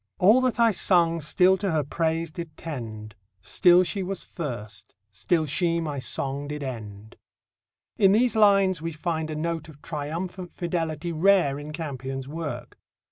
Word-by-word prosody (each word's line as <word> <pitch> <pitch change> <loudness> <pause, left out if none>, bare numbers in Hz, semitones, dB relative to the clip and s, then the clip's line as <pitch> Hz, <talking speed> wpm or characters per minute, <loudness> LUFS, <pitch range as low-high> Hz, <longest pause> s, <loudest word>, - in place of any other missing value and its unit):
All 215 +8 +5
that 255 -2 0
I 230 -1 +5
sung 170 -4 +2
still 180 +6 +3
to 200 0 -2
her 155 -2 +1
praise 165 +2 -1
did 165 -1 -8
tend; 110 -9 -7 0.3
Still 180 - +5
she 195 +2 -3
was 185 -1 -4
first, 110 - -7 0.2
still 160 - 0
she 170 +3 0
my 150 -4 -3
song 140 +2 -2
did 150 0 -5
end 110 -5 -8 0.8
in 195 -2 +6
these 235 +1 +3
lines 195 -5 +4
we 165 0 -4
find 160 0 -3
a 155 - -4
note 165 0 -3
of 150 -2 -14
triumphant 170 +4 -5
fidelity 170 -2 -2
rare 165 -4 +3
in 150 +1 -8
Campion's 135 -4 -5
work. 155 0 -6
165 Hz, 155 wpm, -25 LUFS, 145-180 Hz, 0.8 s, in